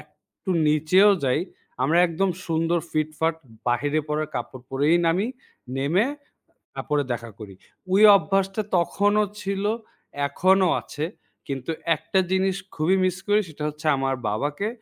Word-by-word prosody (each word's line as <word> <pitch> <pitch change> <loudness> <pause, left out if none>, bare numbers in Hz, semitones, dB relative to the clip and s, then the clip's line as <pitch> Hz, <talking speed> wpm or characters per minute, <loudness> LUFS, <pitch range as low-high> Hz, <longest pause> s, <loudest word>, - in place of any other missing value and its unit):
একটু 190 - -11 0.2
নিচেও 160 +7 +5
যাই, 130 +4 +2 0.4
আমরা 160 +6 +3
একদম 180 +3 0 0.2
সুন্দর 165 +1 +1
ফিটফাট 155 +1 0 0.3
বাহিরে 145 +6 +1
পরা 150 +1 0
কাপড় 130 -1 -5
পরেই 145 +5 +3
নামি। 185 +6 +2 0.5
নেমে 160 +11 +2 0.7
তার - - -5
পরে 145 -1 +2
দেখা 115 -1 -5
করি। 100 -3 -10 0.4
ওই 205 - +5
অভ্যাসটা 195 +4 0
তখনও 205 +4 +2 0.2
ছিল, 195 +1 -2 0.6
এখনও 190 +2 +3
আছে। 150 0 -5 0.4
কিন্তু 135 +3 -4 0.3
একটা 175 +5 -1
জিনিস 190 0 +1 0.2
খুবই 170 +5 +2
মিস 185 -1 +1
করি। 210 +1 +4
সেটা 150 -1 -9
হচ্ছে, 150 +1 -7
আমার 135 0 0
বাবাকে। 145 - -2
165 Hz, 135 wpm, -24 LUFS, 145-190 Hz, 0.7 s, নিচেও